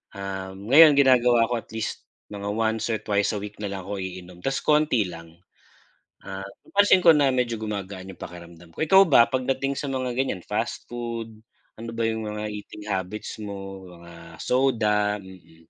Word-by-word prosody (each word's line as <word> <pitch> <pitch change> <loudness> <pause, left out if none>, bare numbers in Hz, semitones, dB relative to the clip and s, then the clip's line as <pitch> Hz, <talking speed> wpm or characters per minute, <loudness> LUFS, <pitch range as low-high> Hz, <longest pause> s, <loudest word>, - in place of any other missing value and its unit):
Ah, 95 -1 -5
ngayon, 140 +9 +7
ginagawa 125 -4 +5
ko 120 - +1
at - - -15
least 110 - -4 0.3
once 110 +3 -1
or 110 - +1
twice 100 0 +1
a 105 - -2
week 105 0 -8
na 105 - -2
lang 95 -2 -5
ako 100 -1 -4
iinom 90 -1 -8
'tas 135 0 0
konti 150 -7 +3
lang. 85 -1 -11 0.9
Ah, 95 0 -6 0.2
napansin 200 -1 +5
ko 165 - +9
na 140 -2 +4
medyo 125 -2 0
gumagaan 100 -3 -5
yung - - -17
pakiramdam 85 -1 -11
ko. - - -3
Ikaw 190 +4 +7
ba 120 -5 +7
pagdating 135 +1 -1
sa 145 - -3
mga 130 -1 -2
ganyan 105 -9 -1
fast - - -3
food, 115 -2 -5 0.4
ano 115 0 -6
ba 115 - -1
yung 110 -1 -3
mga 105 0 -4
eating 105 0 -9
habits 95 +4 -4
mo 95 -2 -7
mga 85 -1 -13
soda? 105 -5 +1
Mm. 90 -3 -16
105 Hz, 170 wpm, -25 LUFS, 95-125 Hz, 0.9 s, ko